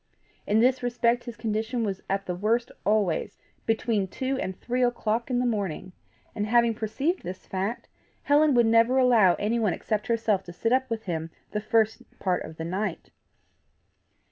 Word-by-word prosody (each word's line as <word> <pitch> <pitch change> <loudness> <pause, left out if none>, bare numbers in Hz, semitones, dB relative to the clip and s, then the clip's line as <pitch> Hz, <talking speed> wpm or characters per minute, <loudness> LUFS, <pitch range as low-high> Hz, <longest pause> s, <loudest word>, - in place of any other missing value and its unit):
In 215 +2 +3
this 255 +1 +3
respect 245 0 +1
his 240 -2 -7
condition 225 +2 -2
was 195 -3 -3
at 195 0 -1
the 180 - -2
worst 220 +6 0 0.2
always 205 -5 +1 0.3
between 220 -3 +1
two 260 +8 -2
and 185 0 -4
three 250 +1 -2
o'clock 235 -1 0
in 250 - +1
the 250 - +1
morning; 200 -6 -2 0.4
and 210 0 -2
having 235 0 +4
perceived 250 - -2
this 185 +1 -7
fact, 195 +5 -3 0.4
Helen 290 -1 +4
would 240 -1 +5
never 230 +3 +4
allow 235 -8 +5
anyone 215 -1 0
except 215 -1 -2
herself 225 -4 +1
to 175 - -9
sit 225 +7 0
up 260 0 +1
with 225 -1 -3
him 165 -4 -3 0.2
the 210 - -2
first 220 0 +1 0.2
part 180 -2 0
of 160 0 -10
the 160 - -4
night. 185 +1 -3
220 Hz, 170 wpm, -26 LUFS, 195-240 Hz, 0.4 s, would